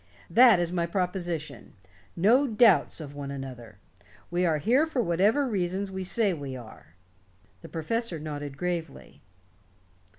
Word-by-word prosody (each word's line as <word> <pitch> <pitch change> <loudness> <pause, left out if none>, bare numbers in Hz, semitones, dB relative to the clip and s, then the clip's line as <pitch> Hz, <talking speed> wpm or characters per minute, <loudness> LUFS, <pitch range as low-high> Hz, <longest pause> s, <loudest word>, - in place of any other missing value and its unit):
That 235 -1 +7
is 175 -1 -1
my 170 -2 -1
proposition. 175 - -4 0.4
No 235 +11 +4
doubts 215 - +4
of 145 -3 -8
one 140 -1 -6
another. 125 -6 -8 0.5
We 175 +1 +1
are 160 -2 +2
here 250 - +2
for 300 -5 -3
whatever 210 +8 +2
reasons 190 -2 -2
we 190 0 -4
say 200 +1 +1
we 140 -5 -6
are." 110 -9 -13 0.7
The 165 - -11
professor 180 +4 -3
nodded 145 -2 -6
gravely. 175 0 -5
175 Hz, 135 wpm, -27 LUFS, 150-205 Hz, 0.7 s, That